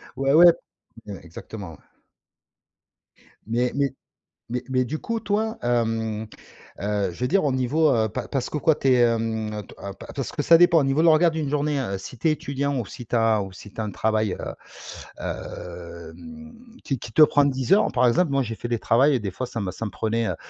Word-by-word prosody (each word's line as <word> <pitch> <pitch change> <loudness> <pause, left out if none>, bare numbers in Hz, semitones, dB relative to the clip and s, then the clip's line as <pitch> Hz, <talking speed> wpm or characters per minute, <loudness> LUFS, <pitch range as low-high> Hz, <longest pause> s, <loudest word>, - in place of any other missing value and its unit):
Ouais, 135 0 +1
ouais. 170 +2 +8 0.7
Exactement, 85 +2 -9
ouais. 80 - -14 1.7
Mais 120 +3 0
mais 140 -1 +1 0.6
mais 125 0 -2
mais 130 -1 +1
du 155 +6 -4
coup 230 -1 -3
toi, 220 +2 -1
hem, 115 -2 -1 0.6
heu, 100 -2 0
je - - -13
veux 125 - 0
dire 195 0 +2
au 140 - +1
niveau, 140 +5 +2
heu, 110 -2 +2
pa - - -5
parce 135 -3 -2
que 150 - -2
quoi 155 +1 +3
tu 135 - -1
es, 130 - +5
hem 110 -2 0
t - - -14
ah 100 0 -7
pa - - -12
parce 135 -3 -4
que 145 - -2
ça 165 +2 +6
dépend 175 -1 +6
au 140 - +1
niveau 135 +3 +1
de 165 - +4
l'organisation 165 +2 +5
d'une 160 -3 -3
journée, 145 0 0
heu, 100 -7 -2
si 105 +5 -9
tu 160 - +1
es 155 - +4
étudiant 140 -1 -2
ou 120 - -2
si 120 +3 -10
tu 120 - -1
as 115 -2 +3
ou 95 - -8
si 100 +2 -12
tu - - -7
as 110 - -1
un 105 - -4
travail, 110 0 0
heu, - - -6 0.7
hem, 90 - -8 0.3
qui 135 - -2
qui 115 - -9
te 155 - +5
prend 145 -1 +6
10 130 +3 -1
heures 200 - +5
par 125 -1 +3
exemple, 150 +5 +2
moi 140 - +2
j'ai 115 -3 -3
fait 120 - -6
des 120 -2 -1
travails 135 +6 +3
et 130 - +1
des 105 -3 -3
fois 130 +7 -4
ça 115 -2 -5
ça 110 +5 -6
me 105 - -4
prenait, 115 +1 -1
heu, - - -2
125 Hz, 225 wpm, -24 LUFS, 110-150 Hz, 1.7 s, ouais